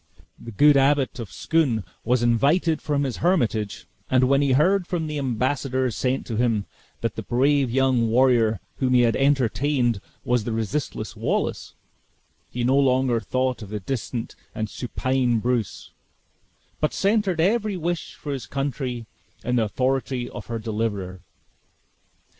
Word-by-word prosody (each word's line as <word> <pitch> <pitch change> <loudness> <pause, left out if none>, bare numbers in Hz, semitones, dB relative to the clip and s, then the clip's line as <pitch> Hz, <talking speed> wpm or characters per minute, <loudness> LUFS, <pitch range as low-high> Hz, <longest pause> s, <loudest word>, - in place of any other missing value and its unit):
The - - -9
good 145 +7 +5
Abbot 135 -1 +2
of 110 -5 -6
Scone 130 -1 +1 0.2
was 120 +1 +1
invited 145 +8 +2
from 145 -1 0
his 130 -3 -3
hermitage; 115 - 0 0.2
and 130 0 +3
when 135 +2 +4
he 140 -2 +2
heard 180 +6 +3
from 170 -3 -2
the 150 -1 -3
embassadors 130 -1 -1
sent 130 +1 -1
to 115 - -4
him, 115 -4 +1 0.4
that - - -2
the - - -4
brave 135 +2 +2
young 130 -2 +2
warrior 115 -3 +3 0.2
whom 130 -1 +1
he 125 - +6
had 115 -1 +3
entertained 135 -3 +1 0.2
was 125 -2 +1
the 115 - -3
resistless 115 +6 -3
Wallace, - - -2 0.7
he 125 - -3
no 130 +3 +3
longer 130 -3 +2
thought 130 +3 -1
of 105 - -8
the 105 0 -4
distant 120 +2 -4 0.2
and 110 -1 -3
supine 125 0 0
Bruce, 110 -6 -2 0.9
but 155 - 0
centered 200 -4 +1
every 205 +3 +1
wish 175 0 -3
for 145 - -5
his 125 -6 -6
country 130 -2 -3 0.4
in 125 0 0
the 115 - +3
authority 130 +2 -1
of 105 - -8
her 115 - -3
deliverer. 105 -5 -3
130 Hz, 150 wpm, -24 LUFS, 115-140 Hz, 0.9 s, he